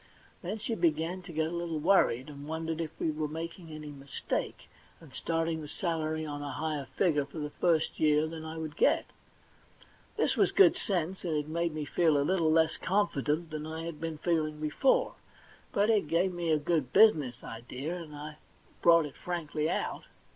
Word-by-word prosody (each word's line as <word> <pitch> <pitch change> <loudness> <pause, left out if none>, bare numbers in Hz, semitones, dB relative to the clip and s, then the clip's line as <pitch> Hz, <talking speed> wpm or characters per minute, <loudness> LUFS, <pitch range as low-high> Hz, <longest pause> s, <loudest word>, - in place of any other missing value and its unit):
Then 195 +5 -3
she 220 +2 -3
began 170 0 0
to 180 0 -10
get 160 0 0
a 160 - -3
little 170 -2 -2
worried, 150 -7 +3
and 145 -1 -9
wondered 160 +1 -3
if 160 - -3
we 160 - +1
were 155 0 -2
making 165 +2 -6
any 150 -1 -7
mistake, 140 -1 -4 0.3
and 160 -6 -15
starting 165 +2 -1
the 150 - -7
salary 160 -1 -2
on 145 -1 -5
a 145 - -4
higher 150 -3 -3
figure 155 -6 +3
for 140 +4 -11
the 150 -1 -4
first 165 -1 +1
year 150 0 +4
than 160 0 -6
I 160 0 -6
would 155 -2 -5
get. - - +3 1.1
This - - +2
was - - +3
good 390 -4 +6
sense, 185 -1 -2
and 165 -3 -1
it 150 0 -2
made 170 0 -1
me 155 -1 -3
feel 160 0 +3
a 140 - +2
little 165 -2 +2
less 160 0 +3
confident 165 -4 0
than 155 0 -4
I 160 +1 -5
had 165 -2 -6
been 165 -1 -3
feeling 155 -2 0
before; 155 - +2 0.6
but 205 +3 +3
it 205 -8 +2
gave 180 +4 +2
me 175 -1 -2
a 155 - +4
good 150 -4 0
business 145 - +4
idea, 125 +8 -5
and 160 -4 -8
I 150 +1 -8 0.4
brought 170 -2 +6
it 145 - -9
frankly 160 -3 -2
out. - - -2
160 Hz, 190 wpm, -30 LUFS, 150-170 Hz, 1.1 s, good